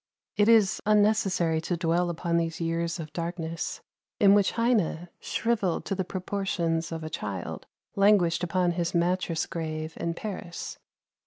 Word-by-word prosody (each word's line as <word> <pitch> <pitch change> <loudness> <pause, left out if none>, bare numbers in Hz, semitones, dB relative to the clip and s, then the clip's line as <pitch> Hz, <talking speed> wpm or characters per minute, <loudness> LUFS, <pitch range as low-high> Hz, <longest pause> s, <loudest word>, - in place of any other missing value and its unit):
It 205 +1 +4
is 220 -4 +5
unnecessary 205 -6 +3
to 175 +1 -2
dwell 170 +1 +1
upon 170 0 -1
these 165 0 -1
years 165 0 -1
of 155 -2 -7
darkness, 170 -1 -4 0.4
in 200 -3 +7
which 205 -1 +3
Heine, 210 -8 +1
shriveled 215 -7 -1
to - - -2
the 190 -1 -1
proportions 180 -3 -2
of 160 -1 -4
a 155 - -4
child, 100 -8 -5 0.3
languished 195 -4 +4
upon 180 0 +1
his 170 0 -2
"mattress 170 -1 +1
grave" 155 -1 -4
in 170 0 -2
Paris. 185 -4 -6
175 Hz, 145 wpm, -27 LUFS, 165-195 Hz, 0.4 s, in